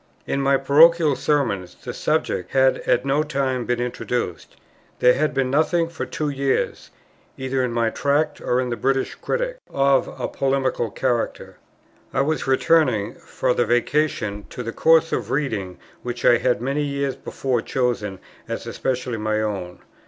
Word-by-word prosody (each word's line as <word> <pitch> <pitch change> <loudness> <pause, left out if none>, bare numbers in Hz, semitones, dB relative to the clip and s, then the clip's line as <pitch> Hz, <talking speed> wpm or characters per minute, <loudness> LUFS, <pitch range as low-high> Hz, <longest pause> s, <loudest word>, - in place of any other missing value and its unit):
In 140 - -1
my 135 0 +3
Parochial 155 +2 +5
Sermons 110 -14 -1
the - - -8
subject 90 0 -1
had 130 0 +4
at 125 +2 +2
no 140 +2 +2
time 135 -4 -1
been 120 -1 0
introduced: 125 0 -3 0.4
there 125 - +5
had 155 +2 +1
been 130 -1 0
nothing 165 +3 +2
for 165 - -5
two 150 -1 -2
years, 140 -1 -1 0.5
either 130 0 -1
in 125 - -1
my 115 -1 +1
Tracts 145 +2 0
or 125 - +1
in 125 -1 -1
the - - 0
British 135 +2 0
Critic, - - -3
of 135 0 +2
a - - -1
polemical 135 -3 0
character. 120 +2 -2 0.6
I - - +3
was 155 +1 -1
returning, 135 -6 +2
for - - -2
the 120 - +2
Vacation, 120 -4 0
to 125 - -6
the 115 -1 -5
course 165 0 +4
of - - -2
reading 110 -10 -2 0.2
which 120 0 -5
I 120 - +6
had 125 -2 0
many 140 +3 0
years 140 -1 -2
before 130 -3 -2
chosen 120 -7 -1 0.3
as - - -4
especially 125 -2 -2
my 110 0 -1
own. 95 -5 -4
130 Hz, 160 wpm, -22 LUFS, 120-140 Hz, 0.6 s, I